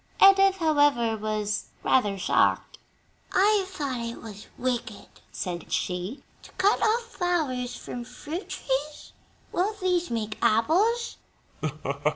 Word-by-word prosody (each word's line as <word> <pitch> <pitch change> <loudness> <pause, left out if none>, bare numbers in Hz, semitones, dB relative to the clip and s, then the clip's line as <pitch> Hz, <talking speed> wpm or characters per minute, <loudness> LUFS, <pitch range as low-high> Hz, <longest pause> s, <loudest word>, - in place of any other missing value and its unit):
Edith, 390 0 +7
however, 290 -9 +3
was 215 0 -2 0.2
rather 205 -6 +2
shocked. 185 - +1 0.5
"I 405 +1 +4
thought 280 -9 -3
it 235 0 -5
was 210 -2 -10
wicked," 240 -4 -3 0.3
said 175 -2 -5
she, 180 +8 -2 0.2
"to - - -14
cut 395 +3 +2
off 450 +2 +2
flowers 315 - -1
from 245 0 -6
fruit 290 - -7
trees? 285 +2 -3 0.4
Won't 410 +4 -1
these 360 -2 +1
make 220 -2 -3
apples?" 385 - +2
270 Hz, 115 wpm, -26 LUFS, 225-370 Hz, 0.5 s, Edith